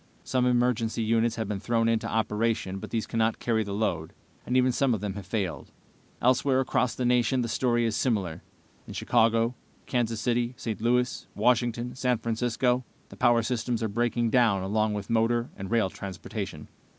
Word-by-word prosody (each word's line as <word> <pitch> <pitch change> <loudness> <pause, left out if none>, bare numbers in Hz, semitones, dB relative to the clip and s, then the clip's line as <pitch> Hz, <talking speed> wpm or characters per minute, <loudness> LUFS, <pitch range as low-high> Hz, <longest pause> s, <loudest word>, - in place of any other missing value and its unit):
Some 125 -1 +1
emergency 120 -2 +1
units 115 +1 +2
have 110 -3 -3
been 100 -1 -3
thrown 115 +2 +1
into 115 -1 0
operation, 110 -2 0
but - - -8
these 115 -2 -1
cannot 115 0 0
carry 110 -2 0
the 100 - -6
load, 90 -6 -2 0.3
and 125 - +2
even 130 0 +4
some 125 -1 +2
of - - -4
them 100 0 -3
have 100 -2 -8
failed. 95 -4 -3 0.5
Elsewhere, 130 +2 +3
across 130 -2 +1
the 125 - -2
nation, 125 +1 +2
the - - -2
story 120 0 +1
is 110 -2 0
similar. 95 -9 -1 0.5
In - - -8
Chicago, 115 0 +2 0.3
Kansas 115 -3 -1
City, 120 0 0
St. 110 -2 -4
Louis, 125 +1 +1
Washington, 120 0 +1
San 125 -2 0
Francisco 120 +2 0 0.3
the - - -11
power 120 -2 +3
systems 120 0 -1
are 110 - 0
breaking 120 +1 0
down 115 -7 +3
along 105 +2 0
with 100 -1 -5
motor 115 +1 +1
and 95 -1 -7
rail 110 -5 +2
transportation. 95 -2 -6
115 Hz, 175 wpm, -27 LUFS, 110-125 Hz, 0.5 s, even